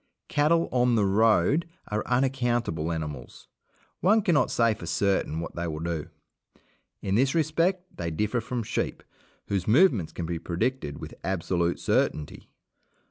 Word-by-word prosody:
Cattle 165 +3 +3
"on 125 -1 +3
the 105 -3 +3
road" 110 - +3 0.2
are 105 +1 -1
unaccountable 120 - 0
animals; 80 -3 -6 0.5
one 210 +5 +4
cannot 155 -8 +3
say 115 -1 +3
for 85 -5 -9
certain 95 -4 0
what 85 - -6
they 85 0 -2
will 75 -2 -4
do. 80 -2 -3 1.0
In 95 - -1
this 130 +7 +2
respect 165 +4 +1
they 85 -1 -2
differ 105 +8 -1
from 120 +1 -3
sheep, - - -3 0.4
whose 95 -3 -2
movements 115 - +4
can 85 - -5
be 85 0 -3
predicted 85 - -2
with - - -8
absolute 85 -2 0
certainty. 75 -1 -1
110 Hz, 140 wpm, -27 LUFS, 85-130 Hz, 1.0 s, one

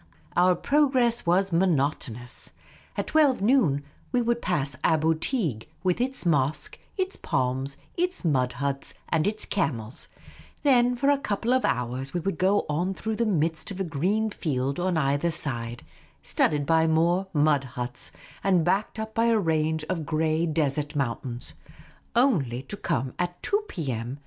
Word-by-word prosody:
Our 180 +1 +5
progress 260 - +2
was 190 +3 +3
monotonous. 140 -8 -1 0.4
At - - 0
twelve, 295 -5 +3
noon, 195 - +3 0.3
we 250 - +2
would 235 0 +1
pass 145 -7 0
Aboo 160 0 +3
Teeg, 160 - -1
with 185 +4 +1
its 260 -4 0
mosque, 150 -3 +1 0.2
its 380 0 0
palms, 130 +2 -1 0.2
its 360 - -1
mud 130 -5 +2
huts, 140 +2 -3
and 160 +1 +2
its 215 +1 -1
camels; 125 - -2 0.6
then 250 -3 +4
for 275 +4 +3
a 285 - +2
couple 225 0 0
of 255 - +2
hours 125 +3 -1
we - - +2
would 195 +3 -3
go 195 +2 +3
on 175 +6 -1
through 220 +2 -3
the 235 0 +1
midst 165 -3 0
of 195 -2 -6
a - - +1
green 190 +7 0
field 140 -5 -2
on 180 -1 +1
either 145 +2 +1
side, 120 -7 -3 0.4
studded 145 -1 +1
by 160 +1 +3
more 170 +4 +2
mud 150 -3 +3
huts, 125 0 -3 0.3
and 185 -4 +3
backed 195 +5 0
up 220 0 -4
by 230 - +2
a 230 -1 +4
range 160 -4 +1
of 175 -4 -2
grey 160 +2 +1
desert 150 -1 0
mountains; 120 -2 -3 0.6
only 155 - +2
to 170 - -6
come 130 - -2
at 175 0 -2
2 415 +1 +1
p.m. 130 - -4
165 Hz, 160 wpm, -26 LUFS, 140-210 Hz, 0.6 s, Our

